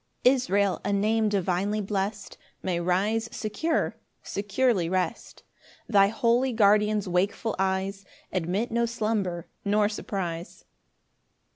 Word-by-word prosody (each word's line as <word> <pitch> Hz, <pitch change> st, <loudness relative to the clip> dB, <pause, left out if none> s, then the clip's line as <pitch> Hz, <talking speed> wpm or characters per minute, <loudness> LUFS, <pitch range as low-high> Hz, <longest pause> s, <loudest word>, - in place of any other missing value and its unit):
4 250 Hz, -, +7 dB
Israel, 200 Hz, -7 st, +1 dB
a 200 Hz, -, -1 dB
name 215 Hz, +2 st, +2 dB
divinely 195 Hz, +1 st, 0 dB
blest, 200 Hz, 0 st, -3 dB, 0.3 s
May 180 Hz, -2 st, 0 dB
rise 205 Hz, +6 st, 0 dB
secure, 315 Hz, +10 st, -1 dB, 0.3 s
securely 200 Hz, -2 st, 0 dB
rest; 185 Hz, 0 st, -3 dB, 0.4 s
Thy 200 Hz, -3 st, +5 dB
holy 240 Hz, +4 st, +1 dB
Guardian's 210 Hz, -1 st, +3 dB
wakeful 200 Hz, +5 st, 0 dB
eyes 190 Hz, +1 st, -1 dB, 0.3 s
Admit 185 Hz, +6 st, -1 dB
no 235 Hz, +1 st, +1 dB
slumber 215 Hz, -7 st, -2 dB, 0.2 s
nor 205 Hz, +1 st, +3 dB
surprise. 180 Hz, -5 st, -5 dB
205 Hz, 110 wpm, -27 LUFS, 190-220 Hz, 0.4 s, 4